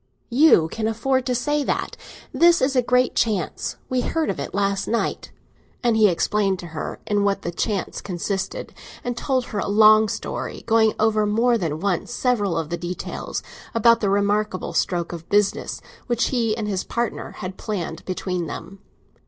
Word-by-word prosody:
"You 250 - +6
can 220 +6 -3
afford 260 +4 0
to 250 - +1
say 295 +4 0
that? - - -2 0.4
This 345 0 +5
is 265 +1 +1
a 255 - +5
great 250 +1 +2
chance; 205 -8 -1
we 255 -1 0
heard 320 +3 0
of - - -6
it - - -4
last 200 0 0
night." 235 - -2 0.5
And 235 -2 +3
he 215 -2 +6
explained 195 +2 +1
to 175 - -8
her 155 - -5
in 205 -2 +1
what 200 -1 0
the 170 - -2
chance 200 +3 -2
consisted; 190 +1 -4 0.3
and 245 -1 -2
told 255 0 0
her 205 - -1
a - - -2
long 215 +1 +6
story, - - -5
going 220 -1 +4
over 215 -1 +2
more 235 +3 +3
than 160 -8 -2
once 200 0 -1
several 225 -8 0
of 165 -1 -3
the 170 - -1
details, 175 +1 -5 0.3
about 230 +1 +5
the 205 - 0
remarkable 205 0 0
stroke 175 -1 0
of 165 -1 -9
business 205 -1 +1 0.3
which 240 -2 +1
he 230 -4 0
and 215 -2 -3
his 195 -3 -1
partner 235 -1 -3
had 185 -1 -7
planned 180 -6 -4
between 180 -2 -3
them. 195 +5 -8
210 Hz, 175 wpm, -23 LUFS, 190-235 Hz, 0.5 s, You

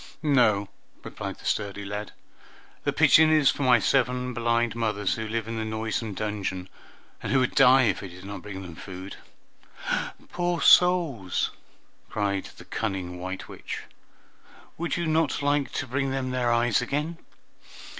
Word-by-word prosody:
"No," 115 -9 +3 0.4
replied - - -6
the - - -15
sturdy 100 -1 -2
lad, 105 +1 -5 0.7
"the - - +2
pigeon 160 0 +6
is 155 -3 +5
for - - -6
my 125 -3 +6
seven 125 +1 +1
blind 120 -1 +1
mothers, 105 -4 0
who 110 -1 -4
live 110 0 -2
in 115 0 -4
the 110 - -2
noisome 110 -1 -3
dungeon, 100 -3 -3 0.5
and - - -3
who 135 - +4
would 130 - +1
die 135 -1 +6
if 105 -5 +1
I 100 - -6
did 90 +1 -12
not 100 0 -6
bring 95 -2 -7
them 90 -2 -9
food." 95 +3 -8 1.1
"Poor 175 -1 -1
souls!" 165 - +4 0.6
cried 100 -2 -1
the - - -12
cunning 95 -5 -3
white 95 +1 -5
witch. - - -7 0.9
"Would 170 +1 -2
you 170 - -1
not 160 -2 +1
like 145 -1 +1
to - - -2
bring 135 +2 -1
them 135 -1 -2
their 125 -2 +1
eyes 120 +1 +3
again? 150 +6 -2
115 Hz, 155 wpm, -26 LUFS, 100-135 Hz, 1.1 s, pigeon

